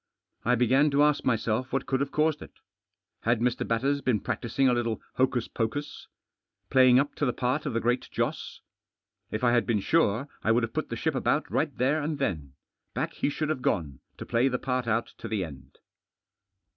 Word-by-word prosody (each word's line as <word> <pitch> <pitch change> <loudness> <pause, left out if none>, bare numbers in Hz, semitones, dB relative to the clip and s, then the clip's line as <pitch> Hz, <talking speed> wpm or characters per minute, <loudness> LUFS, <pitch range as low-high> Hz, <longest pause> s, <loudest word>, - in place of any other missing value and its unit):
I 125 +2 +3
begin 130 +5 +4
to 145 +1 +3
ask 150 -1 +2
myself 115 +1 0
what 135 - -1
could 130 - 0
have 140 0 -1
caused 155 -1 +1
it. - - -11 0.7
Had 115 0 +1
Mr. 125 +1 0
Batters 135 +5 +1
been 125 -6 +1
practising 130 +6 0
a 125 - +4
little 115 -2 -1 0.2
hocus 125 -2 +1
poctis? 135 +6 -4 0.6
Playing 130 -2 +6
Vip 140 +3 +3
to 145 - +1
the - - +2
part 130 +5 -1
of 135 - -2
the - - +2
Great 120 +2 0
Joss? - - -3 0.7
If 110 - -4
I 120 - +4
had 120 -1 +2
been 110 -3 +2
sune> 130 0 +2 0.2
I 110 - +3
would 120 +1 +2
have 115 - -3
put - - -2
the - - -3
ship - - -1
about - - 0
right - - -1
there 140 +5 +2
attd 150 0 -2
then. 80 - -2 0.4
Back - - -2
he - - -1
should 155 +1 -2
have 155 -5 -1
gone, 75 - -1 0.2
to - - -7
play 120 +3 +2
the 125 -2 0
part 125 -1 -2
otit 115 +1 -1
td - - -6
the 105 -4 -1
end. 70 -3 -13
125 Hz, 205 wpm, -27 LUFS, 115-140 Hz, 0.7 s, Playing